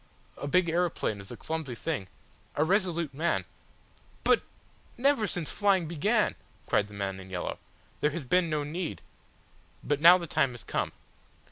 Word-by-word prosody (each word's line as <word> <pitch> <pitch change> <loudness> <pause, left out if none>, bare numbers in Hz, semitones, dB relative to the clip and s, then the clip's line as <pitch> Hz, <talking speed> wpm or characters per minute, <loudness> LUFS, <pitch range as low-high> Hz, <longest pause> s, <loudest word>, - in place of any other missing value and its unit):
A 140 - -4
big 180 +4 +3
aeroplane 165 - 0
is 100 - -13
a - - -7
clumsy 160 -6 -4
thing. 125 - -3 0.5
A 150 - +3
resolute 170 -4 +1
man 165 +5 0 0.4
!" - - -31
"But - - +5 0.6
never 265 -3 +3
since 175 -4 -2
flying 195 -5 +2
began 205 +8 +2 0.2
" - - -31
cried 105 - +2
the 105 - -12
man 100 -1 -3
in 95 0 -11
yellow. 90 -2 -4 0.4
"There 150 - +3
has 155 -2 -5
been 180 +5 +3
no 150 -1 0
need. 165 +4 -4 0.8
But 145 +1 0
now 175 +3 +10
the 175 - -5
time 135 -5 +1
has 120 - -10
come. - - -1
160 Hz, 170 wpm, -29 LUFS, 135-180 Hz, 0.8 s, now